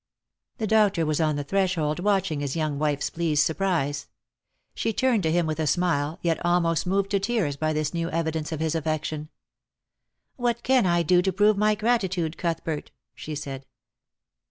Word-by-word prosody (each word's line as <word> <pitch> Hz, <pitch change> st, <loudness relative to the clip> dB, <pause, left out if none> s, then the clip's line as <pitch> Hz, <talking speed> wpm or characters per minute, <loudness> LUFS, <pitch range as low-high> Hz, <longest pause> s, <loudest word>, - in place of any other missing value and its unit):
The 220 Hz, -, -2 dB
doctor 205 Hz, -5 st, +3 dB
was 155 Hz, +1 st, 0 dB
on 155 Hz, -2 st, +2 dB
the 145 Hz, -, -2 dB
threshold 175 Hz, -2 st, 0 dB
watching 195 Hz, -5 st, +1 dB
his 140 Hz, -2 st, -3 dB
young 155 Hz, -3 st, -1 dB
wife's 150 Hz, -2 st, 0 dB
pleased 160 Hz, -3 st, +1 dB
surprise. 160 Hz, -6 st, -1 dB, 0.7 s
She 225 Hz, -, -1 dB
turned 250 Hz, -2 st, +2 dB
to 160 Hz, -3 st, 0 dB
him 175 Hz, 0 st, +2 dB
with 155 Hz, 0 st, -3 dB
a 155 Hz, -, 0 dB
smile, 160 Hz, -1 st, +1 dB
yet 170 Hz, -1 st, 0 dB
almost 170 Hz, -1 st, +1 dB
moved 195 Hz, +1 st, 0 dB
to 200 Hz, -, +2 dB
tears 195 Hz, -8 st, 0 dB
by 155 Hz, +2 st, -1 dB
this 155 Hz, 0 st, -1 dB
new 170 Hz, 0 st, -2 dB
evidence 160 Hz, -1 st, -2 dB
of 160 Hz, -1 st, -3 dB
his 160 Hz, -1 st, 0 dB
affection. 155 Hz, -1 st, -2 dB, 0.5 s
" -, -, -59 dB, 0.3 s
What 240 Hz, -2 st, -1 dB
can 255 Hz, -5 st, +3 dB
I 175 Hz, -1 st, +2 dB
do 175 Hz, +2 st, +4 dB
to 190 Hz, +1 st, 0 dB
prove 205 Hz, +3 st, +3 dB
my 210 Hz, +1 st, +2 dB
gratitude, 190 Hz, -7 st, 0 dB
Cuthbert? 165 Hz, -3 st, -3 dB
" -, -, -62 dB
she 155 Hz, -, -7 dB
said. 135 Hz, -2 st, -6 dB
165 Hz, 180 wpm, -25 LUFS, 155-195 Hz, 0.7 s, do